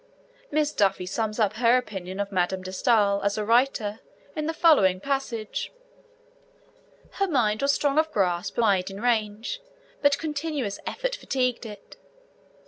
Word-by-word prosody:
Miss 300 0 0
Duffy 195 -2 +1
sums 215 +3 -2
up 215 -2 +2
her 240 +1 +5
opinion 190 -6 -5
of 200 0 -2
Madame 185 0 0
de 185 - -6
Stael 200 -1 +3
as 200 +1 0
a 210 - -1
writer 230 -2 +2 0.4
in 305 -1 -2
the - - +1
following 195 - +5
passage: 255 -3 -3 1.5
Her 395 - +2
mind 220 - +1
was 280 0 +3
strong 285 +1 +2
of 315 0 +1
grasp 180 - 0
and 235 - +1
wide 195 -4 +2
in 195 +1 -8
range, 225 - -1 0.4
but 285 -1 +4
continuous 295 -8 -3
effort - - -2
fatigued 250 - -1
it. 205 -2 -12
225 Hz, 150 wpm, -26 LUFS, 200-280 Hz, 1.5 s, her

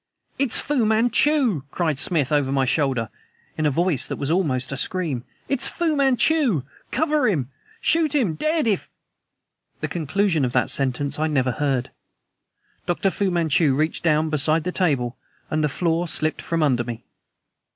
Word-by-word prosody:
"IT'S 270 -4 +3
FU 285 -5 0
MANCHU!" 230 - +2
cried 155 -3 -1
Smith 155 -5 +1
over 145 -3 +1
my 135 -1 +2
shoulder, 130 -5 0 0.5
in 155 - 0
a - - +3
voice 155 -2 +1
that - - -3
was 140 +2 -3
almost 140 -8 0
a - - -2
scream. 155 -6 -1 0.2
"IT'S 275 -2 +1
FU 330 -3 0
MANCHU! 270 - +2 0.3
Cover 300 -2 +1
him! 145 - -1 0.3
Shoot 315 -2 +2
him 230 - +2
dead 310 - 0
if 210 -4 0 0.5
" - - -50
The - - -1
conclusion 170 0 0
of 125 -2 -1
that 125 -2 +1
sentence 140 +2 -1
I 155 - +1
never 130 -4 +1
heard. 135 -1 -1 1.0
Dr. 185 +2 +1
Fu 200 0 0
Manchu 160 -4 +2
reached 155 +3 0
down 155 -1 +1
beside 155 +2 +2
the 180 - -2
table, 135 -10 0 0.3
and 155 0 0
the 150 - +2
floor 170 +3 0
slipped 155 -1 -1
from 165 -1 -1
under 125 -5 +2
me. 120 0 -7
160 Hz, 165 wpm, -23 LUFS, 140-205 Hz, 1.0 s, IT'S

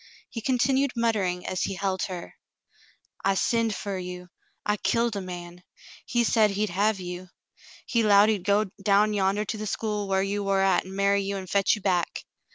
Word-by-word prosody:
He 230 - -5
continued 265 +2 +1
muttering 200 -6 0
as 185 - -2
he 195 - -1
held 190 0 -2
her: 180 -3 -7 0.9
*'I 195 0 +2
sinned 230 +1 +1
fer 200 -2 -4
you. 180 0 -7 0.4
I 210 0 +1
killed 230 +1 0
a 200 - -2
man. 175 -1 -8 0.5
He 240 0 +2
said 220 -2 +4
he'd 205 0 -1
hev 205 +3 +1
you. 180 0 -7 0.6
He 235 - +1
'lowed 205 -1 +6
he'd 205 -5 0
go 205 +2 +3 0.2
down 205 +2 +3
yander 200 +1 +1
to 215 - -4
the 215 - -4
school 210 -1 -2
whar 190 0 +1
you 200 +1 -2
war 195 -1 +1
at 195 -2 +2
an' 190 - -8
marry 200 0 +2
you 200 0 -3
an' 190 - -6
fetch 195 +1 +2
you 210 - -10
back. 180 -3 0
200 Hz, 190 wpm, -26 LUFS, 185-215 Hz, 0.9 s, lowed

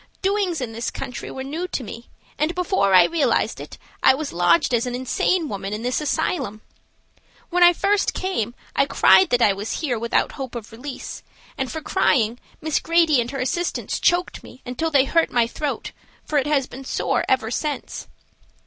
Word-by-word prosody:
Doings 385 -5 0
in 240 -3 -3
this 230 +1 -3
country 250 - -6
were 265 - -6
new 315 +7 -4
to 275 - -4
me, 230 +2 -9 0.3
and 310 +3 0
before 360 - +2
I 180 - +9
realized 330 -4 +1
it - - -9 0.2
I - - +6
was 300 +1 -5
lodged 175 +5 +3
as 235 +1 +1
an 245 - -3
insane 310 +7 0
woman 200 -3 -5
in 215 +2 -4
this 250 +4 0
asylum. 300 - -1 0.9
When 355 +1 +1
I 350 0 +9
first 400 +3 +1
came 245 - -2 0.2
I 275 - +3
cried 375 +4 +5
that 245 -1 +3
I 200 - +5
was 200 +3 -4
here 255 -8 -1
without 235 +1 +1
hope 265 -4 -7
of 230 -1 -7
release, 255 +4 -7 0.3
and 265 -1 -3
for 315 - -5
crying 245 - +1 0.2
Miss 315 -1 0
Grady 330 -5 +3
and 235 - -4
her 275 +1 -5
assistants 335 +7 -2
choked 350 +1 +1
me 255 - -15
until 250 +6 -2
they 280 -3 +4
hurt 330 +4 +2
my 240 -2 +2
throat, 285 +5 -4 0.3
for 295 - +1
it 270 - -2
has 285 -3 +2
been 265 +1 -10
sore - - -1
ever 255 -4 +1
since." 295 +3 -4
270 Hz, 190 wpm, -22 LUFS, 235-325 Hz, 0.9 s, I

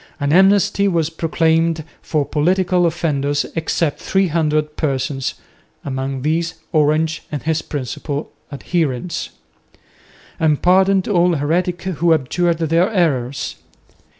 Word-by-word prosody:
An 145 0 0
amnesty 200 +2 +4
was 165 -4 0
proclaimed 165 0 +1 0.2
for 150 -3 -1
political 180 +4 +2
offenders 145 -4 -1
except 160 -1 -1
three 190 -1 +1
hundred 150 -1 0
persons 135 -2 -2 0.5
(among 135 -1 -3
these 165 +2 0 0.2
Orange 155 +1 +1
and 150 - -4
his 160 0 0
principal 145 +2 -5 0.2
adherents), 155 +1 -2 1.1
and 155 -3 +2
pardon 190 +1 +4
to - - -4
all 175 -2 +3
heretics 175 +5 -1
who 170 -2 +2
abjured 165 +4 0
their 165 +4 +2
errors. 140 - -1
160 Hz, 115 wpm, -19 LUFS, 145-175 Hz, 1.1 s, amnesty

